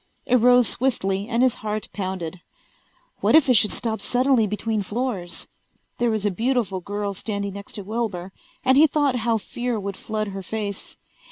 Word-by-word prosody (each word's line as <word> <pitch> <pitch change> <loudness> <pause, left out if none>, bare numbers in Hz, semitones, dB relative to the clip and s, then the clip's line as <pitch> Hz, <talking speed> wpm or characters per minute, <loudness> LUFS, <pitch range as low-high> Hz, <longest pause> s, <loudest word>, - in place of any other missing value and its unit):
It 250 - +4
rose 245 0 +5
swiftly 200 -6 0
and 235 +1 +2
his 255 -2 +4
heart 215 0 -3
pounded. 185 -3 -4 0.8
What - - +4
if 315 -3 +6
it 255 - +5
should 210 -2 +4
stop 220 -3 -2
suddenly 245 0 +3
between 210 +1 -1
floors? 200 -5 -3 0.5
There 240 - +2
was 215 -2 -1
a 205 - +2
beautiful 225 -2 0
girl 205 +2 -3
standing 200 0 -4
next 200 0 -9
to 205 - -6
Wilbur 200 -4 -3 0.3
and 260 +1 +5
he 315 - +8
thought 285 -3 +1
how 230 -1 +1
fear 240 +2 -3
would 200 -1 -4
flood 215 0 -3
her 195 0 -5
face. 200 +1 -5
215 Hz, 175 wpm, -24 LUFS, 200-245 Hz, 0.8 s, he